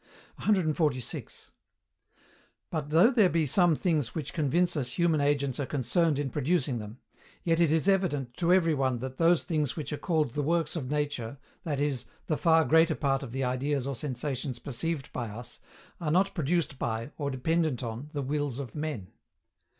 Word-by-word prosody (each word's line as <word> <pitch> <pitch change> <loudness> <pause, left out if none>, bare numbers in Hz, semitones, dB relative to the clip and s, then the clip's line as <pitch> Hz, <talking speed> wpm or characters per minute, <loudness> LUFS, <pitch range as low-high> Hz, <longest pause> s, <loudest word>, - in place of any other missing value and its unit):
146. 155 - -1 1.2
But, 155 -3 -3
though 170 - +6
there 220 -7 +5
be 165 -2 +1
some 170 +3 +3
things 150 -8 0
which 155 -5 -4
convince 170 +4 +1
us 125 -4 -2
human 165 -2 +2
agents 140 -2 +1
are 140 - -1
concerned 150 +3 +1
in 140 -2 -2
producing 135 -4 0
them; 105 +2 -8 0.5
yet 165 -1 +2
it 170 -3 +4
is 160 +3 +2
evident 150 -11 +1
to 175 -1 +2
every 175 -3 +4
one 130 -3 +1
that 130 +2 -6
those 170 0 +4
things 150 -5 -1
which 155 -1 -4
are 150 - -4
called 155 -7 +1
the 145 - -2
Works 160 +1 0
of 135 -6 -3
Nature, 145 -4 -2 0.3
that 145 -4 -1
is, 145 -4 -1 0.2
the 155 - 0
far 160 0 +4
greater 160 0 +4
part 135 -2 0
of 135 -4 -7
the 135 +2 -2
ideas 130 +2 0
or 140 0 -3
sensations 130 0 -3
perceived 140 +4 -4
by 120 -2 -3
us, 120 +3 -9 0.4
are 165 -4 -2
not 190 +5 +2
produced 160 -2 0
by, 115 +4 -2
or 140 -1 -1
dependent 145 0 0
on, 120 +5 -5
the 145 -2 -3
wills 145 -2 -2
of 135 -5 -6
men. 150 -11 -4
145 Hz, 180 wpm, -29 LUFS, 130-165 Hz, 1.2 s, though